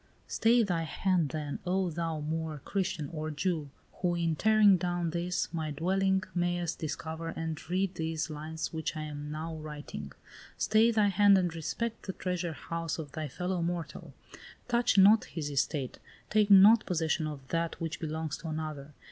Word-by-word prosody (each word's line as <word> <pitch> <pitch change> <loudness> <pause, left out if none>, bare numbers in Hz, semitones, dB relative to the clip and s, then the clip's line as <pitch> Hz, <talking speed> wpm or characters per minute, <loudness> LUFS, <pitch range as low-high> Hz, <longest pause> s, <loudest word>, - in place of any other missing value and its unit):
"Stay 230 +1 +3
thy 175 -5 0
hand, 170 0 0
then, 150 -1 -4
oh 185 0 0
thou, 165 -1 -2
Moor, 160 0 -3
Christian, 185 -6 -1
or 155 -1 -4
Jew, 155 -1 -2 0.3
who, 175 -1 +1
in 165 -2 0
tearing 215 +1 +5
down 175 -1 -1
this, 175 +1 -1
my 160 -2 -2
dwelling, 190 +5 +1
mayest 175 -1 -1
discover 160 +1 -4
and 160 0 -5
read 185 +1 0
these 160 -2 -2
lines 155 +1 -5
which 160 0 -3
I 155 - -3
am 150 -1 -6
now 160 +2 -4
writing! 150 - -7 0.5
Stay 220 +2 +4
thy 215 -3 +3
hand 200 0 +6
and 175 -3 0
respect 225 +9 -4
the 190 - -2
treasure 180 -3 -2
house 165 0 -4
of 150 -4 -6
thy 155 -1 -4
fellow 180 +5 -2
mortal! 170 -1 -4 0.5
Touch 240 -2 +2
not 205 +3 +7
his 150 -3 -5
estate! 140 -1 -1 0.3
Take 210 -1 +3
not 205 +3 +8
possession 160 -3 0
of 140 -3 -7
that 165 0 -1
which 165 -1 -4
belongs 160 -1 -3
to 165 - -8
another! 155 -2 -5
165 Hz, 165 wpm, -30 LUFS, 155-185 Hz, 0.5 s, not